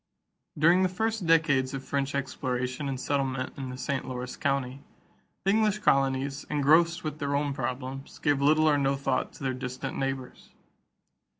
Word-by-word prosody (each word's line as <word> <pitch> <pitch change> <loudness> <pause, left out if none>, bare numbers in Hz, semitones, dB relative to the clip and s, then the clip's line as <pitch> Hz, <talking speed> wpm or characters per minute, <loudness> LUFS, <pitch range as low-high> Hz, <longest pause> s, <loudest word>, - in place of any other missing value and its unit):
= - - -30
During 170 +5 +5
the 185 - +3
first 220 0 -1
decades 140 -5 +3
of 135 - -5
French 140 0 -1
exploration 130 0 -2
and 130 -1 -3
settlement 135 -2 -1
in 135 -2 -5
the 125 - -6
St. 140 +1 -2
Lawrence 125 -1 -5
country, 135 -2 -1 0.6
the 195 - +3
English 215 -1 +2
colonies, 135 -5 +1
engrossed 160 +4 +3
with 155 -1 -4
their 140 -1 -1
own 145 0 0
problems, 130 +1 -5
gave 145 -2 +1
little 155 +2 +4
or 145 -2 +4
no 135 0 +2
thought 135 -1 -1
to - - -11
their 130 -1 0
distant 130 +1 -5
neighbors. 135 -1 -4
140 Hz, 170 wpm, -28 LUFS, 130-155 Hz, 0.6 s, During